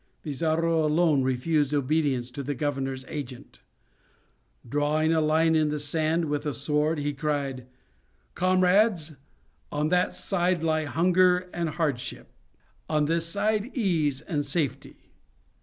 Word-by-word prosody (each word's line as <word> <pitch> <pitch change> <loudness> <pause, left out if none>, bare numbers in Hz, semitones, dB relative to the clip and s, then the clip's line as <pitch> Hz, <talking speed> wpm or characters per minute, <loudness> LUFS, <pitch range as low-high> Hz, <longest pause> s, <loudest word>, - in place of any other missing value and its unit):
Pizarro 160 +2 0
alone 155 -2 +3
refused 140 +3 +1
obedience 140 -3 0
to 140 - -6
the 140 +1 -3
governor's 135 -1 -3
agent. 135 -5 -8 1.1
Drawing 150 +2 +1
a 160 - +2
line 160 +1 +3
on 155 -1 +2
the 150 - -2
sand 155 +3 0
with 145 -1 -2
his 150 -3 -3
sword, 150 +2 0
he 145 0 -2
cried: 140 -4 -3 0.7
"Comrades! 185 -1 +2 0.6
on 150 +1 0
that 180 +1 +1
side 180 -3 0
lie 155 -1 +1
hunger 180 +5 +3
and 170 -2 -1
hardship; 150 -6 -3 0.6
on 150 -1 +2
this 165 +2 0
side, 205 +3 0
ease 160 - +1
and 145 -3 -2
safety. 140 -2 -4
155 Hz, 125 wpm, -26 LUFS, 145-165 Hz, 1.1 s, alone